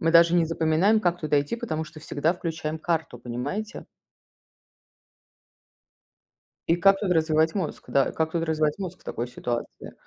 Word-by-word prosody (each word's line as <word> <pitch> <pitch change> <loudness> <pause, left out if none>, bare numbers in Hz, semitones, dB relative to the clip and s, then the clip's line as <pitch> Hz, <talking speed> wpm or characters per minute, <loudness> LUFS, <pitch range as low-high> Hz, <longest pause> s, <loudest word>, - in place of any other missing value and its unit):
мы 165 - +2
даже 170 +1 +6
не 170 -2 +4
запоминаем, 165 +6 +2
как 175 -3 0
туда 150 -2 +2
идти, 145 +11 -3
потому 160 -7 -3
что 155 0 -12
всегда 155 +2 0
включаем 160 -3 -4
карту, 160 -7 -2
понимаете? 135 - -5 2.8
И 165 - +4
как 195 +2 +4
тут 195 -3 -1
развивать 160 0 +2
мозг, 185 -6 -3
да? 135 -1 +2
Как 160 0 -1
тут 170 -1 0
развивать 155 0 0
мозг 185 -2 -6
в - - -24
такой 120 - -3
ситуации? 120 -1 -5
160 Hz, 155 wpm, -26 LUFS, 155-175 Hz, 2.8 s, даже